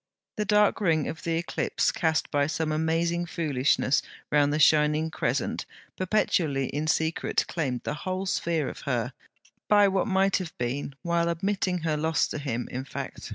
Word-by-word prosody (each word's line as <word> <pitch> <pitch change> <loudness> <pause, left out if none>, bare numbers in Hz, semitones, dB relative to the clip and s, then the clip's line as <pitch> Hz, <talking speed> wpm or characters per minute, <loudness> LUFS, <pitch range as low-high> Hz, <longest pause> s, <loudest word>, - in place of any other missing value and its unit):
The 210 - 0
dark 210 +1 +3
ring 160 -6 +2
of 155 - -5
the 165 -1 -1
eclipse 170 - 0
cast 160 -2 0
by 145 0 +2
some 155 0 -1
amazing 165 +2 0
foolishness 145 -5 +1 0.3
round 145 -1 +4
the 150 - +1
shining 155 +1 +4
crescent - - -1 0.3
perpetually 170 -8 +1
in 150 +2 -2
secret 160 +1 +1
claimed 130 -7 -2
the - - -2
whole 185 +1 -2
sphere 165 -5 0
of - - -7
her, - - -1 0.5
by 205 -1 +6
what 190 +1 +1
might 195 -1 +3
have 175 -4 -6
been, 135 +3 -3
while 170 -1 +1
admitting 185 +1 0
her 155 -2 0
lost 160 +1 +1
to - - -3
him 125 -4 -3
in 130 +1 -3
fact. 135 - -7
160 Hz, 165 wpm, -27 LUFS, 150-180 Hz, 0.5 s, by